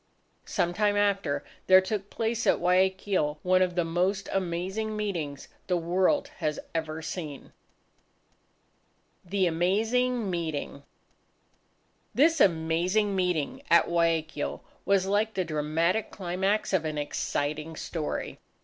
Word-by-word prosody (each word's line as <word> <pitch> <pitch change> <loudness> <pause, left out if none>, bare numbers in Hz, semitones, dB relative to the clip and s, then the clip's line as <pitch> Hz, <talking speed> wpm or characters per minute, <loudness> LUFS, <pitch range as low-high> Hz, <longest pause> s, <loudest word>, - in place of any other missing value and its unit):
Some 175 -3 0
time 205 +1 +2
after, 200 -8 +1 0.2
there 185 0 +9
took 200 +1 -3
place 230 +1 -1
at - - +5
Guayaquil 185 -3 +1
one 185 0 +3
of 180 -1 +1
the 175 -2 +1
most 185 +4 0
amazing 190 +4 -2
meetings 165 -10 -3 0.2
the 180 -1 +2
world 185 - +1
has 155 -3 -2
ever 160 -1 -3
seen. 155 -4 -6 1.7
THE 190 +1 0
AMAZING 220 +8 +1
MEETING 160 -5 -3 1.3
This 320 +3 +4
amazing 180 +4 +2
meeting 180 -6 -1
at 170 - +6
Guayaquil, 165 -3 0 0.2
was 195 -1 +3
like 210 +3 +1
the 185 - 0
dramatic 160 +6 0
climax 190 +3 -1
of 185 -4 +2
an 155 -1 -3
exciting 150 +2 -2
story. 155 -1 -4
180 Hz, 115 wpm, -28 LUFS, 160-200 Hz, 1.7 s, there